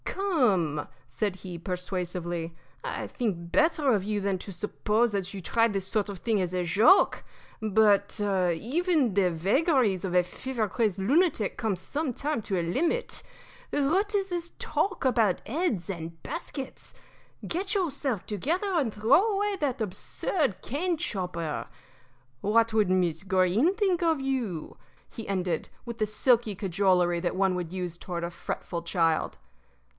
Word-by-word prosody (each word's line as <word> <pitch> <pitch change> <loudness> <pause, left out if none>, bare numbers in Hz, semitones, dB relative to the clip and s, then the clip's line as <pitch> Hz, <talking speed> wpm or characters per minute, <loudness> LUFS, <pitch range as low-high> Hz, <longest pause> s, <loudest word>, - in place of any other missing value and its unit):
"Come," 210 - +1 0.2
said 185 +10 -2
he, 180 -2 -7
persuasively, 175 -2 -3 0.3
"I - - -3
think 175 -8 -3
better 300 -4 +3
of 200 -3 +1
you 210 +1 -1
than 195 -2 -1
to 195 - -8
suppose 210 +4 0
that 195 -2 -2
you 195 - -6
try 230 +6 +3
this 195 -3 -3
sort 210 -1 0
of 195 -3 -6
thing 220 -4 +1
as 180 -1 -2
a 180 -1 0
joke. 220 - +5 0.4
But 210 -1 +3
even 215 - +1
the 190 -2 +3
vagaries 205 - +2
of 180 -2 -2
a 180 - +6
fever 235 +4 -3
crazed 210 -2 0
lunatic 275 - +2
come 220 -4 -1
some 275 - -3
time 285 -1 -2
to 190 -3 -1
a - - -1
limit. 330 - -1 0.5
What 375 +9 +1
is 390 -1 0
this 345 -1 -3
talk 360 -7 -1
about 225 -7 +2
heads 245 - -1
and 165 -3 -6
baskets? 275 -5 -6 0.5
Get 380 +5 -1
yourself 280 - -1
together 335 - -1
and 285 -10 +1
throw 285 - +4
away 410 0 0
that 285 -8 -1
absurd 220 - -2
cane 335 +7 -1
chopper. 180 - -3 0.7
What 225 +2 +3
would 215 -4 +3
Miss 175 -4 +1
Greene 190 - +3
think 385 -5 +1
of 325 -3 +2
you?" 250 - -3 0.3
he 225 - -8
ended, 180 -4 -1 0.2
with 235 -1 -6
the 215 - +1
silky 225 0 +2
cajolery 180 -2 +2
that 175 0 -2
one 190 0 +2
would 180 -2 -3
use 180 -2 -4
toward 175 -1 -5
a 170 - -3
fretful 170 0 -4
child. 165 -2 0
210 Hz, 150 wpm, -28 LUFS, 180-280 Hz, 0.7 s, a